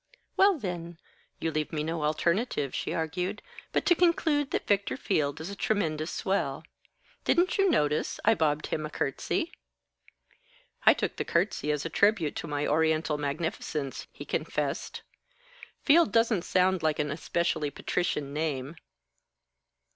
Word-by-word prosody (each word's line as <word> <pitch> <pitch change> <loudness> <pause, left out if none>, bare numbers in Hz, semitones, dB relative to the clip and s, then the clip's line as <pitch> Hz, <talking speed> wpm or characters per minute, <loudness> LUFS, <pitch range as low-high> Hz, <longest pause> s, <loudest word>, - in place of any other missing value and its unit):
"Well, 390 -2 +5
then, 175 - -5 0.4
you 165 - -1
leave 155 -1 -2
me 150 -2 -2
no 160 0 -2
alternative," 155 - 0
she - - -2
argued, 180 +5 -2 0.3
"but - - 0
to - - +6
conclude 325 -5 +2
that - - -2
Victor 200 +4 +1
Field 150 - 0
is 165 +5 -5
a - - -6
tremendous 160 -7 -1
swell. 160 -8 -1 0.6
Didn't 360 +3 +2
you 390 -1 +5
notice, 150 - +1
I 225 - +6
bobbed 155 -5 +1
him 155 - -2
a 150 - -4
curtsey?" 325 - -2 1.4
"I - - +9
took - - -2
the - - -1
curtsey 170 -3 0
as 150 0 -2
a - - -2
tribute 200 -7 +2
to - - -4
my 145 0 -1
Oriental 160 0 +1
magnificence," 145 -1 -3
he - - -9
confessed. - - -3 0.8
"Field 320 +2 +5
doesn't 225 -5 +2
sound 185 -1 +2
like 155 -1 +1
an 150 -1 -1
especially 160 0 -1
patrician 145 -1 -2
name. 150 -1 -2
165 Hz, 145 wpm, -28 LUFS, 150-205 Hz, 1.4 s, I